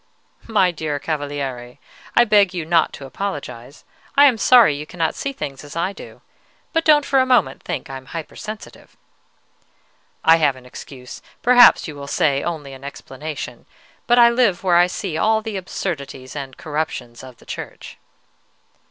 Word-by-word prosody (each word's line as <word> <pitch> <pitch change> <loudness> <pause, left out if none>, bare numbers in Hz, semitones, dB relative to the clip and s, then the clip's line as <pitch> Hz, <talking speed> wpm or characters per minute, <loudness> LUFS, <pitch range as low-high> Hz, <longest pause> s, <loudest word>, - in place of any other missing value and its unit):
"My 200 -5 +3
dear 155 -3 -3
Cavaliere, 140 -5 -4 0.4
I 240 - +7
beg 205 -4 +4
you 170 -3 -3
not 165 0 +2
to 140 - -9
apologize. 140 -6 -6 0.3
I 285 - +8
am 250 -6 +4
sorry 235 - +6
you 150 +2 -7
cannot 165 -3 -1
see 275 - -4
things 140 - -7
as 145 +1 -11
I 175 +4 -1
do; - - -12 0.5
but 325 - +2
don't 295 -2 +5
for 270 - +3
a 260 - +4
moment 230 - +2
think - - -5
I 135 - -6
am 130 0 -14
hypersensitive." 210 +7 -9 1.3
"I 165 0 +6
have 145 -4 +2
an 130 -1 -15
excuse, 125 0 -10 0.2
perhaps 245 -4 +7
you 155 - -7
will 140 0 -8
say 140 -1 +1
only 150 -5 -5
an 135 0 -12
explanation; 140 -2 -8 0.4
but 240 - +4
I 235 -1 +7
live 235 -8 +2
where 180 -2 +4
I 175 +1 +5
see 180 -3 -4
all 220 0 +2
the 220 -2 -5
absurdities 150 -8 -5
and 135 -3 -7
corruptions 145 -6 -4
of 130 -2 -12
the - - -20
Church." - - -8
160 Hz, 170 wpm, -20 LUFS, 140-210 Hz, 1.3 s, I